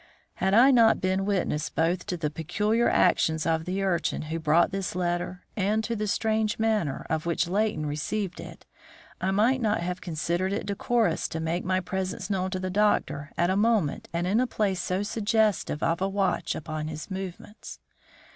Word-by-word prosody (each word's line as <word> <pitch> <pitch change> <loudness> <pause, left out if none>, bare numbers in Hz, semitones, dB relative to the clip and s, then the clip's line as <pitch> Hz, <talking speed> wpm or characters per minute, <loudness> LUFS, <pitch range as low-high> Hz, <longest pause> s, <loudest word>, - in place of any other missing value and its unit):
Had 190 +1 +2
I 255 +5 +7
not 230 -3 +5
been 190 +1 0
witness 180 -7 0
both 170 +3 0
to 180 - -2
the 150 -3 -2
peculiar 210 +9 +1
actions 160 -3 +2
of 160 -1 0
the 190 +2 -2
urchin 180 -5 0
who 160 +2 -4
brought 160 +3 +3
this 195 -3 -3
letter, 175 0 -2
and 210 +2 +1
to 230 +1 -2
the 215 -1 -2
strange 220 +1 0
manner 215 -11 0
in 160 - +1
which 170 +1 -1
Leighton 195 -4 0
received 170 +6 -3
it, - - -10 0.6
I 185 - 0
might 225 +7 +2
not 215 -5 +1
have 180 +2 -3
considered 175 +2 -1
it - - -2
decorous 205 -1 0
to 160 - -5
make 165 +2 -2
my 185 0 0
presence 190 +1 -4
known 190 -1 0
to 185 -1 -3
the 185 0 -3
doctor 185 -7 +1
at 175 +2 +2
a - - +1
moment 210 -7 +1
and 170 +1 -1
in 200 +5 +2
a 255 - +2
place 195 -6 -1
so 185 +3 -1
suggestive 215 -6 0
of 165 +2 +1
a 195 - +1
watch 190 -4 0
upon 155 0 -4
his 155 +4 -7
movements. 190 +2 -7
185 Hz, 185 wpm, -27 LUFS, 170-210 Hz, 0.6 s, I